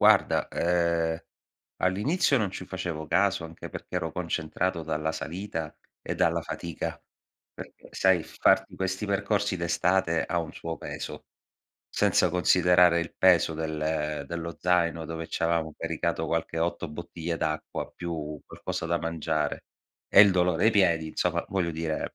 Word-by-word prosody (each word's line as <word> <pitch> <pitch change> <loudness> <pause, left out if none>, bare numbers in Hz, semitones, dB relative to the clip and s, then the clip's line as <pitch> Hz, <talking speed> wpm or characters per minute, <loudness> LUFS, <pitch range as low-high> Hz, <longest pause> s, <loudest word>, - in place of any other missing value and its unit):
Guarda, - - +5
ehm, 85 -1 +1 0.6
all'inizio 135 - +2
non 105 -5 0
ci 95 - -6
facevo 85 -4 -4
caso, 100 -3 +2
anche 80 0 -8
perché - - -6
ero - - -2
concentrato 85 +2 -2
dalla 80 0 -1
salita 80 -1 -5 0.3
e - - -3
dalla - - +2
fatica. 85 -1 -5 0.5
Perché, - - -11
sai, 95 -3 +3
farti - - +2
questi 95 +2 -2
percorsi 100 -1 0
d'estate 85 0 +1
ha 85 - -1
un 80 -1 -4
suo 80 -1 -5
peso, - - -7 0.6
senza 90 - +2
considerare 90 0 +5
il 85 - -5
peso 85 -3 +5
del 75 -2 -2
dello 85 -1 -5
zaino, 85 -2 +2
dove 80 0 -5
c'avevamo 85 -2 0
caricato 80 0 -2
qualche 80 +1 -1
8 85 0 -1
bottiglie 85 +1 -5
d'acqua 80 -1 -3
più 80 -4 -5
qualcosa - - -5
da 85 +1 +1
mangiare, 80 -2 -2 0.4
e - - +8
il 100 -1 +8
dolore 90 0 +2
ai - - +6
piedi, 85 -6 +3
insomma, - - 0
voglio 90 -4 -1
dire 80 -1 -3
85 Hz, 140 wpm, -27 LUFS, 80-90 Hz, 0.6 s, e